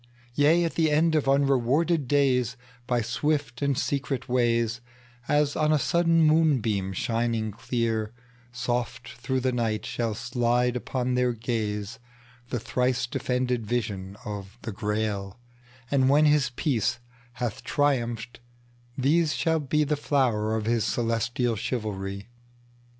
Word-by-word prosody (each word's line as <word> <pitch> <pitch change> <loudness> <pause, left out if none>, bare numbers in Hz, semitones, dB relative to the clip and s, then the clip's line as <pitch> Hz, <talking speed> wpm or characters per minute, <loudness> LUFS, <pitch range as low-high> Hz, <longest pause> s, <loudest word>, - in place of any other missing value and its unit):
Yea! 150 +6 +4
at 165 - -1
the 160 -2 +2
end 160 +2 +3
of 150 -3 +1
unrewarded 140 +3 +2
days, 125 -4 +2 0.3
By 120 -2 +1
swift 135 +2 -1
and 140 -2 +1
secret 135 -2 -1
waysAs 120 +3 -1
on 155 0 +2
a 155 - +4
sudden 165 +2 +2
moonbeam 130 -12 +2
shining 115 +2 -1
clear, 115 -1 -2 0.4
Soft 120 0 -3
through 130 +2 -3
the 130 0 +1
night 115 -3 -1
shall 115 -3 -2
slide 125 0 0
upon 125 0 -2
their 125 -1 +1
gazeThe 110 -2 -3 0.6
thrice 125 +2 0
defended 125 -2 -1
vision 100 -5 -3
of 100 0 -7
the 110 - -4
Grail:And 120 +5 -3
when 150 +2 +5
his 150 -3 +3
peace 125 - 0 0.4
hath 120 -3 -4
triumphed, 120 -5 -1 0.6
these 150 +4 +2
shall 160 -1 +1
beThe 150 +1 +1
flower 115 -7 +1
of 110 -1 -2
his 115 -1 +1
celestial 115 +1 0
chivalry. 100 -3 -4
125 Hz, 120 wpm, -26 LUFS, 115-140 Hz, 0.6 s, when